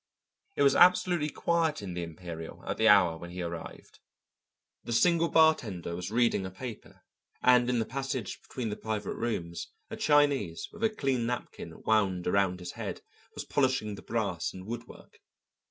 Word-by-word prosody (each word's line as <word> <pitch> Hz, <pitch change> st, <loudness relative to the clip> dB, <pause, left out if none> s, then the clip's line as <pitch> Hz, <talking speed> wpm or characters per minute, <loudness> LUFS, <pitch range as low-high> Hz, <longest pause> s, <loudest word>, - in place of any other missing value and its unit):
It 145 Hz, -, +2 dB
was 140 Hz, -1 st, +5 dB
absolutely 180 Hz, -3 st, +5 dB
quiet 165 Hz, -5 st, 0 dB
in 95 Hz, -3 st, -5 dB
the 90 Hz, -, -3 dB
Imperial 85 Hz, -1 st, -8 dB
at -, -, -3 dB
the 110 Hz, -, +3 dB
hour 90 Hz, -6 st, +5 dB
when 85 Hz, -, -8 dB
he 90 Hz, 0 st, -5 dB
arrived. 85 Hz, -1 st, -8 dB, 0.8 s
The 120 Hz, -, -4 dB
single 170 Hz, +6 st, +3 dB
bartender 115 Hz, -, +2 dB
was 90 Hz, +1 st, -5 dB
reading 115 Hz, -3 st, +2 dB
a 95 Hz, -, -4 dB
paper, 115 Hz, +4 st, -9 dB, 0.4 s
and 125 Hz, -1 st, +5 dB
in 125 Hz, -, +1 dB
the 115 Hz, -, 0 dB
passage 130 Hz, -3 st, -4 dB
between 120 Hz, -4 st, -5 dB
the -, -, -3 dB
private 105 Hz, -2 st, -3 dB
rooms 85 Hz, -8 st, -3 dB, 0.2 s
a -, -, -3 dB
Chinese 145 Hz, -, +2 dB
with 210 Hz, -, -8 dB
a 225 Hz, -, +4 dB
clean 135 Hz, -, -1 dB
napkin 125 Hz, 0 st, -6 dB
wound 100 Hz, -5 st, +2 dB
around 95 Hz, -1 st, +1 dB
his 90 Hz, -, -6 dB
head -, -, -6 dB, 0.3 s
was -, -, -5 dB
polishing 130 Hz, -6 st, +1 dB
the 100 Hz, -, -9 dB
brass 100 Hz, -7 st, -2 dB
and 95 Hz, 0 st, -9 dB
woodwork. 115 Hz, +2 st, -9 dB
110 Hz, 170 wpm, -29 LUFS, 90-135 Hz, 0.8 s, was